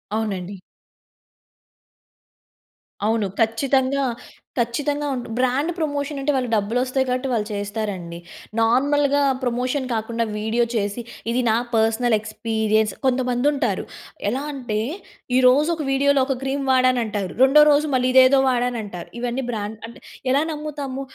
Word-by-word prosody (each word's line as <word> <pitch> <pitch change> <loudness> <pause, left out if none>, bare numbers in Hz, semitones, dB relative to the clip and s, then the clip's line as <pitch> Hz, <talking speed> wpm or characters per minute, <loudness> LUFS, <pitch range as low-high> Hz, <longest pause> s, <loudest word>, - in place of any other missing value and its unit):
అవునండి. 200 -3 -3 2.5
అవును. 220 -2 +1
ఖచ్చితంగా, 265 +4 +1 0.6
ఖచ్చితంగా 290 +5 -1
ఉంటు 245 - -5
బ్రాండ్ 260 +6 +1
ప్రమోషన్ 290 -2 -2
అంటే 295 - +1
వాళ్ళకి 250 -3 -1
డబ్బులొస్తాయి 250 +5 0
కాబట్టి 255 +2 -1
వాళ్ళు 210 -3 0
చేస్తారండి. 205 -4 -4 0.4
నార్మల్‌గా 285 +5 +3 0.2
ప్రమోషన్ 255 +2 -1
కాకుండా 230 +1 -1 0.2
వీడియో 220 +3 +1
చేసి, 205 +2 -1 0.3
ఇది 250 - +1
నా 220 - +3 0.2
పర్సనల్ 225 +1 +2
ఎక్స్‌పిరియన్స్. 220 0 0
కొంతమంది 250 0 +1
ఉంటారు 240 -9 -1 0.4
ఎలా 255 +5 -2
అంటే, 240 -6 -3 0.6
ఈ - - +5
రోజు 290 +5 +4
ఒక 315 - -4
వీడియో‌లో 275 0 +3
ఒక 270 - 0
క్రీమ్ 270 +1 -2
వాడనంటారు, 240 -7 +1
రెండో 300 +3 +7
రోజు 295 +1 +3
మళ్ళీ 255 0 +2
ఇదేదో 260 +1 +7
వాడానంటారు, 240 -7 -2
ఇవన్నీ 245 +2 -2
బ్రాండ్ 215 -1 -5
అంటే, 235 - -14 0.3
ఎలా 280 +3 +3
నమ్ముతాము 290 -3 -5
250 Hz, 120 wpm, -22 LUFS, 220-275 Hz, 2.5 s, రెండో